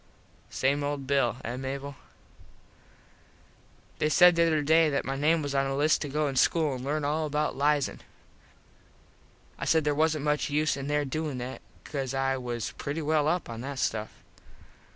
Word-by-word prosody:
Same 140 +2 0
old 145 -1 -3
Bill, 135 -3 +1
eh 120 +2 -4
Mable? 135 +1 -5 2.0
They 155 - +2
said 180 +2 +6
the 170 0 +4
other 155 -2 +1
day 160 +2 +4
that 140 - -1
my 135 - -2
name 155 +3 +2
was 140 -1 -3
on 135 0 +1
a 135 - -2
list 150 +2 +3
to 145 - -3
go 150 +2 0
to - - -8
school 155 +2 +2
an 125 -1 -6
learn 145 +2 -1
all 155 +2 0
about 150 +1 -1
liason. 145 0 +1 1.6
I - - -3
said 160 -1 +3
there 150 0 +1
wasnt 155 0 +1
much 150 0 0
use 150 +1 +1
in 140 0 -5
there 145 0 0
doin 150 0 -3
that 125 +2 -6 0.2
cause 135 -3 -4
I 135 0 +1
was 120 -3 -4
pretty 150 +3 -3
well 150 0 +2
up 175 +3 0
on 115 -1 -7
that 140 +1 -5
stuff. 110 -4 -1
145 Hz, 180 wpm, -28 LUFS, 135-155 Hz, 2.0 s, said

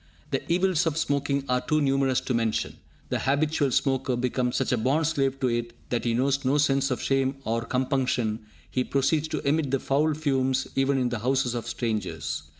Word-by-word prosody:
The - - 0
evils 180 -1 +2
of 155 -1 -1
smoking 140 -2 0
are 125 0 +1
too 155 - +1
numerous 135 -2 +2
to 130 - -2
mention. 115 -2 -1 0.3
The - - 0
habitual 145 +1 +1
smoker 130 0 +1
becomes 125 0 -1
such - - 0
a 125 - +2
bond 140 +8 +1
slave 135 -3 0
to 130 - +2
it 120 -1 -2 0.2
that 120 -1 -1
he 115 -1 +1
knows 140 +3 +1
no 135 +3 +2
sense 140 -1 +2
of 125 - -1
shame 135 0 +1
or 115 +1 0
compunction; 125 -3 0 0.3
he 130 - +1
proceeds 145 +4 +1
to 150 - -3
emit 150 0 +1
the 135 0 +1
foul 145 +3 +1
fumes 135 -3 0
even 135 0 +2
in 125 -2 +1
the 120 -2 -3
houses 130 +1 +1
of 120 -2 -4
strangers! 95 - -3
135 Hz, 195 wpm, -26 LUFS, 125-140 Hz, 0.3 s, evils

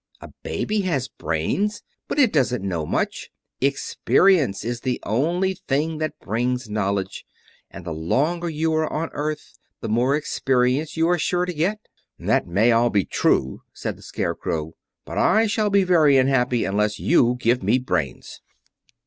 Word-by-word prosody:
A - - -11
baby 210 0 -1
has 140 -9 -1
brains, 185 - -2 0.2
but - - -3
it 260 -7 +4
doesn't 125 -8 +1
know 85 -5 -2
much. - - -2 0.3
Experience 140 - +2
is 120 0 -3
the 125 -2 -2
only 170 - 0
thing 155 +3 0
that 155 -1 -3
brings 125 +3 -2
knowledge, 100 -2 -2 0.5
and 95 - -11
the 85 - -4
longer 150 - 0
you 160 +1 -1
are 155 0 0
on 160 +2 -2
earth 150 +1 -5 0.2
the 115 - -5
more 125 +5 +2
experience 135 0 0
you 165 0 +3
are 175 0 +2
sure 180 +3 0
to 180 - -4
get." 185 +7 -1 0.4
"That - - 0
may 105 +7 +3
all 120 +1 +3
be 100 -4 +1
true," 65 0 0
said - - -4
the - - -18
Scarecrow, 80 0 -3 0.3
"but - - -4
I 220 +1 +4
shall 215 0 0
be 200 -1 +4
very 160 -6 +4
unhappy 130 -2 +2
unless 105 +2 0
you 125 -7 +3
give 125 +1 +1
me 125 - +2
brains." 90 - -3
135 Hz, 160 wpm, -23 LUFS, 110-165 Hz, 0.5 s, it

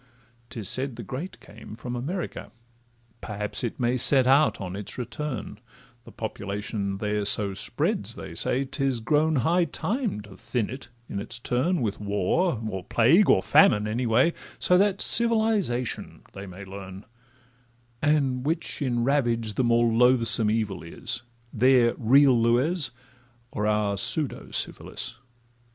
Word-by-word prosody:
'Tis 110 -5 -6
said 130 +2 -1
the 115 - -8
great 140 - -7
came 110 0 -12
from 120 +2 -6
America; 160 +9 -5 0.7
Perhaps 105 +2 -3
it 120 - -4
may 120 0 +1
set 130 +1 +7
out 140 +4 +3
on 95 -1 -6
its 100 0 -6
return,— 125 -3 -6 0.5
The - - -13
population 100 -2 -4
there 105 0 -2
so 100 -1 +1
spreads, - - -2
they - - -9
say 130 - +1
'Tis 135 -2 -2
grown 150 +7 +1
high 175 +1 +2
time 220 - -3
to 105 -2 -14
thin 115 -1 -3
it 130 -1 -8 0.2
in 100 - -5
its 115 +4 -4
turn, 130 +8 -1
With 105 -3 -3
war, 105 - 0
or 95 -3 -5
plague, 130 - +3
or 95 - +4
famine, 105 0 +4
any 120 +3 -2
way, 125 +9 +3 0.2
So 180 - +2
that 200 -1 +1
civilisation 220 - +2
they 100 +1 -9
may 95 +2 -10
learn; 95 0 -10 1.0
And 140 -4 +1
which 160 +2 -2
in 120 -4 0
ravage 120 -5 0
the 125 - 0
more 120 0 +3
loathsome 115 -2 +4
evil 110 -3 -2
is— 85 +8 -5 0.3
Their 125 0 +4
real 135 +3 +4
lues, 125 +8 +1 0.6
or 105 - -2
our 105 -1 0
pseudo 150 +6 +1
syphilis? 115 - -4
120 Hz, 145 wpm, -25 LUFS, 105-140 Hz, 1.0 s, set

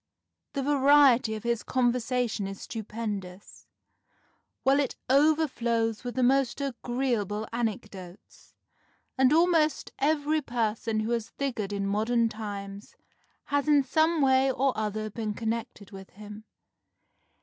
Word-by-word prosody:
The 275 - -2
variety 275 -5 +4
of 215 - -7
his 235 -1 0
conversation 245 -4 0
is 195 0 -8
stupendous, 210 -4 -7 1.0
while 270 +2 +4
it 280 -3 -1 0.2
overflows 260 -7 +2
with 245 -1 -5
the 260 - +1
most 265 +1 +2
agreeable 240 -5 -2
anecdotes, 205 -5 -6 0.6
and 265 0 +4
almost 320 -2 +2
every 305 +1 +1
person 225 -3 -1
who 220 +2 -3
has 230 -1 -2
figured 235 -8 -4
in 200 -1 -2
modern 225 +3 +1
times 200 -2 -7 0.6
has 285 0 +1
in 290 -2 +5
some 315 +3 +2
way 265 0 +4
or 265 0 0
other 215 0 -3
been 215 -1 -4
connected 225 -3 -4
with 195 -1 -11
him. 210 +1 -11
235 Hz, 120 wpm, -27 LUFS, 215-270 Hz, 1.0 s, in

